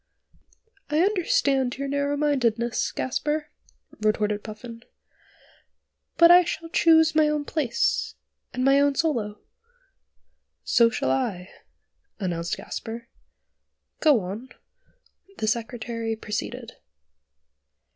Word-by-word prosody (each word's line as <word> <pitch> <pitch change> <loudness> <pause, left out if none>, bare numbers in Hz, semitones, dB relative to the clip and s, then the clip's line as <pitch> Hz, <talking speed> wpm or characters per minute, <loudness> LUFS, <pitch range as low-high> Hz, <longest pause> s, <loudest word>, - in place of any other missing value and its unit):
"I 300 - 0
understand 285 - +1
your 275 0 -3
narrow 285 +1 -1
mindedness, 240 -6 0
Gasper," 300 +4 -2 0.5
retorted 210 -1 0
Puffin; 230 +1 -9 1.4
"but 335 0 +8
I 355 +1 +8
shall 330 -1 -5
choose 320 -2 +4
my 310 -1 +4
own 300 -1 -1
place 280 -8 -1 0.4
and 255 +1 -2
my 275 +1 +5
own 285 0 +2
solo." 235 -11 -1 1.3
"So 235 -1 +4
shall 130 - -1
I," 180 +8 -2 0.7
announced 170 -3 -2
Gasper; 230 +1 -7 0.9
"go 295 -8 +4
on." 205 +8 -7 0.9
The - - -2
Secretary 230 0 -2
proceeded. 210 -1 -6
245 Hz, 95 wpm, -25 LUFS, 220-300 Hz, 1.4 s, but